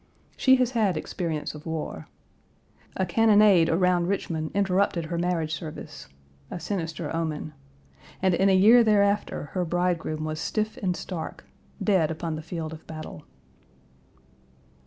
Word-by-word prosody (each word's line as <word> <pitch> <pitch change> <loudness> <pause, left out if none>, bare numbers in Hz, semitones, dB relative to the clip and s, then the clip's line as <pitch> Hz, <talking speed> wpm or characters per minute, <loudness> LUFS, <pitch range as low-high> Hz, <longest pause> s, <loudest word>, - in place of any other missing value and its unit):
She 260 -1 +5
has 255 -1 +1
had 210 -8 +1
experience 160 -1 -3
of 150 +2 -10
war. 155 - -5 0.9
A 190 - +1
cannonade 205 -3 +5
around 175 0 +2
Richmond 165 -5 -2
interrupted 190 -3 +1
her 170 +2 -4
marriage 170 -3 -1
service 155 0 -7 0.4
a - - -5
sinister 165 -4 -4
omen 155 -2 -3 0.7
and 190 -1 +2
in 195 +3 +3
a 190 - +5
year 225 +6 +7
thereafter 205 -7 +1
her 185 - 0
bridegroom 175 -3 -1
was 155 0 -4
stiff 215 +6 -2
and 180 -3 -1
stark 170 -4 -6 0.4
dead 185 -7 +3
upon 160 0 -3
the 155 - -5
field 160 -1 -5
of 160 - -12
battle. 155 -1 -8
175 Hz, 135 wpm, -26 LUFS, 160-200 Hz, 0.9 s, year